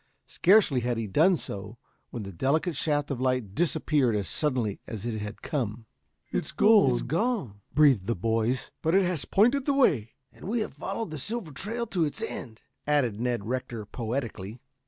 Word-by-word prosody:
Scarcely 185 -8 +4
had 120 -1 -1
he 115 - -2
done 165 - +4
so 105 0 -7 0.3
when 115 - -6
the 100 - -7
delicate 150 - 0
shaft 145 0 0
of 130 -2 -3
light 130 -6 0
disappeared 145 -5 +1
as 100 -3 -1
suddenly 125 -9 0
as 110 -2 -6
it 115 -2 -2
had 105 +1 -7
come. 115 -6 -3 0.5
"It's - - -2
gone," 165 - +2
breathed 135 -10 +4
the 115 - +1
boys. 115 +5 0
"But 160 +2 +2
it 195 - +5
has 175 -5 -1
pointed 245 +7 +3
the 285 - +2
way." 140 - +2 0.2
"And - - -13
we 225 +4 0
have - - -4
followed 225 -7 -4
the 155 - -5
silver 210 - -3
trail 225 - -3
to 185 -6 0
its 145 - -5
end," 115 -3 -6 0.2
added 130 -8 +1
Ned 120 -4 -1
Rector 120 -2 -4
poetically. 115 -2 -4
130 Hz, 175 wpm, -27 LUFS, 115-170 Hz, 0.5 s, it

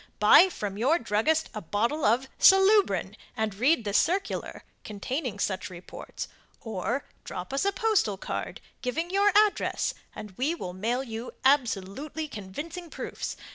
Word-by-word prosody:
Buy 380 - +7
from 205 - -5
your 280 +9 +3
druggist 270 +7 0
a 215 - -5
bottle 230 - -1
of 240 +5 +2
SALUBRIN, 390 +2 +5 0.2
and 220 -2 -1
read 250 +4 +2
the 205 - -2
circular, 365 - 0 0.2
containing 235 +3 -4
such 190 -2 -2
reports; 180 -1 -8 0.3
or 225 +5 -3 0.2
drop 180 +8 -6
us 275 - 0
a 400 - +3
postal 395 - +1
card, - - -5 0.2
giving 320 +7 -2
your 400 +1 +4
address, 420 0 +2 0.2
and 210 - -8
we 295 +6 +1
will 180 - -6
mail 230 +7 -1
you 230 -1 -6
absolutely 270 +3 +1
convincing 300 - -7
proofs. - - -5
255 Hz, 140 wpm, -27 LUFS, 210-330 Hz, 0.3 s, Buy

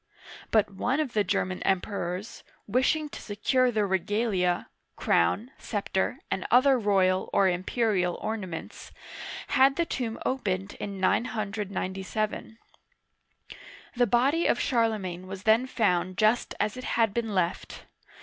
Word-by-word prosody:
But 215 -2 +3
one 245 +9 0
of 295 -6 -1
the 210 - +2
German 185 -1 -1
Emperors, 190 +1 -2 0.2
wishing 260 +8 +1
to - - -9
secure 250 +5 +1
the 215 -2 +1
regalia 190 -1 0 0.3
(crown, 210 - +1
scepter, 200 -3 -2
and 190 - -1
other 255 +1 +5
royal 190 -3 +2
or 195 - +4
imperial 185 0 0
ornaments), 195 -7 -6 0.6
had 270 0 +4
the 340 - +1
tomb 235 -7 -3
opened 195 -7 -1
in 200 -1 -5
997. 210 0 -2 1.4
The 245 0 +3
body 270 +9 +2
of - - +2
Charlemagne 210 -7 0
was 190 0 -7
then 225 +4 +4
found 185 -7 0
just 220 +3 +2
as 215 - 0
it 255 - -7
had 225 -3 +3
been 225 -3 -2
left. 175 -1 -2
210 Hz, 125 wpm, -27 LUFS, 190-240 Hz, 1.4 s, other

